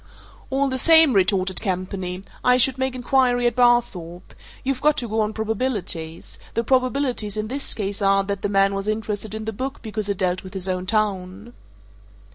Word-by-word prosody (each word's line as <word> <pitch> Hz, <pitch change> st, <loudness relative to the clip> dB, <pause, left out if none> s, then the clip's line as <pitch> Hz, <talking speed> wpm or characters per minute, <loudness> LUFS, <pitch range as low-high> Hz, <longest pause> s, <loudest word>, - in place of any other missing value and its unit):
"All 275 Hz, +1 st, +1 dB
the 260 Hz, -1 st, -2 dB
same," 320 Hz, -2 st, +6 dB
retorted 190 Hz, -1 st, +2 dB
Campany, 185 Hz, -1 st, -3 dB, 0.2 s
"I 250 Hz, 0 st, +5 dB
should 260 Hz, +1 st, +3 dB
make 260 Hz, -1 st, -1 dB
inquiry 250 Hz, -1 st, +2 dB
at 240 Hz, -, +2 dB
Barthorpe. 235 Hz, -9 st, +1 dB, 0.3 s
You've 265 Hz, -1 st, -2 dB
got 300 Hz, +1 st, +3 dB
to 240 Hz, -, -2 dB
go 220 Hz, 0 st, 0 dB
on 210 Hz, 0 st, 0 dB
probabilities. 215 Hz, -8 st, -3 dB, 0.2 s
The 230 Hz, -, +1 dB
probabilities 255 Hz, -4 st, 0 dB
in 215 Hz, 0 st, -3 dB
this 275 Hz, +2 st, -3 dB
case 200 Hz, -1 st, -4 dB
are 195 Hz, 0 st, +3 dB
that 200 Hz, 0 st, -4 dB
the 205 Hz, -, -1 dB
man 195 Hz, 0 st, +3 dB
was 195 Hz, +1 st, -3 dB
interested 215 Hz, -1 st, -3 dB
in 220 Hz, 0 st, -5 dB
the 220 Hz, -, -3 dB
book 265 Hz, +6 st, -5 dB
because 215 Hz, -2 st, -4 dB
it 200 Hz, -, -1 dB
dealt 180 Hz, 0 st, 0 dB
with 190 Hz, +1 st, -11 dB
his 190 Hz, -1 st, -2 dB
own 185 Hz, 0 st, -2 dB
town." 205 Hz, +1 st, -2 dB
215 Hz, 185 wpm, -22 LUFS, 195-250 Hz, 0.3 s, same